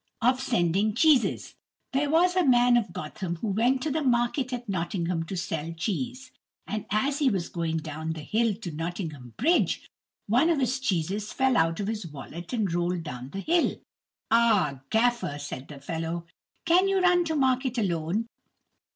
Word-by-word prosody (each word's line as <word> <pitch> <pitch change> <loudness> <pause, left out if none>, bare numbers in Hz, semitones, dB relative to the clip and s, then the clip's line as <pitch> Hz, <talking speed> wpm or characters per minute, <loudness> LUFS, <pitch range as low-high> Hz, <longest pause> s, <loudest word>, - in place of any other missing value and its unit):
Of 255 +2 +2
Sending 200 -3 +1
Cheeses 290 -2 +3 0.4
There 285 +2 +1
was 355 +4 +3
a 365 - +4
man 245 -3 +5
of 225 -6 +1
Gotham 170 +2 -5
who 205 +6 -3
went 245 +6 +2
to 310 - -1
the 315 +3 0
market 250 0 +1
at 245 -1 -4
Nottingham 175 -2 -2
to 190 - -4
sell 165 -2 -3
cheese, 250 +10 -3 0.3
and 215 0 -4
as 270 +8 +1
he 285 -3 +4
was 190 -6 -2
going 165 -2 -2
down 160 +1 -4
the 155 -2 -8
hill 220 +2 +1
to 195 -5 -7
Nottingham 155 - -5
bridge, 335 +8 +2 0.4
one 250 +10 +3
of 325 -4 +2
his 260 0 0
cheeses 200 -2 -1
fell 265 -1 +2
out 165 -6 +2
of 200 - -1
his 210 -3 -3
wallet 160 +3 -9
and 215 -8 0
rolled 175 0 0
down 125 -4 -7
the 195 +7 -5
hill. 340 - +2 0.6
"Ah, 210 - +3
gaffer," 240 -9 +1
said 145 -2 -7
the 145 -2 -10
fellow, 165 +3 -4 0.4
"can 355 +3 +4
you 390 0 +2
run 355 -1 +4
to 320 -1 -1
market 260 -2 +1
alone? 180 +1 0
215 Hz, 175 wpm, -27 LUFS, 165-255 Hz, 0.6 s, man